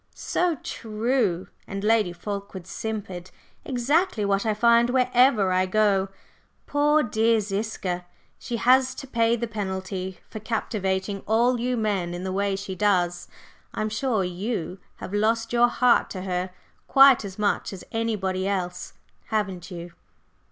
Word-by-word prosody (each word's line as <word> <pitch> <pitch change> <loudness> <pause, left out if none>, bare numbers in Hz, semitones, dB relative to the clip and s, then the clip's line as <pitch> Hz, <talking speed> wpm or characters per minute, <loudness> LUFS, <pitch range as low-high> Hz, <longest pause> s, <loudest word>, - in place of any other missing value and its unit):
"So 355 -2 0
true," 220 -4 -1 0.2
and 195 0 -5
Lady 215 -4 +3
Fulkeward 200 0 -6
simpered. 190 -3 -5 0.3
"Exactly 270 - +1
what 200 +2 +1
I 215 - +1
find 235 +2 +4
wherever 250 -5 +3
I 185 0 +2
go! 195 -1 +2 0.6
Poor 295 +1 +3
dear 225 -1 +2
Ziska! 195 -3 -3 0.3
She 240 - -4
has 255 +2 +4
to 270 - -7
pay 230 -3 +2
the 235 0 -2
penalty 190 -3 -4
for 215 - -7
captivating 200 -3 -2
all 235 +3 +3
you 250 +1 -1
men 195 -6 -1
in 175 - -6
the 190 0 -3
way 200 0 0
she 195 0 -5
does. 180 -3 +1 0.5
I'm 215 - -1
sure 215 -1 0
you 185 0 -4 0.2
have 185 - -8
lost 225 +2 +1
your 240 0 +5
heart 245 0 +3
to 185 -2 -6
her 180 -1 -2 0.4
quite 270 -3 +7
as 195 -2 -8
much 210 -1 0
as 195 - -8
anybody 195 -5 -1
else, 180 -3 -3 0.3
haven't 195 -5 -2
you?" 175 -1 -8
210 Hz, 145 wpm, -25 LUFS, 190-235 Hz, 0.6 s, quite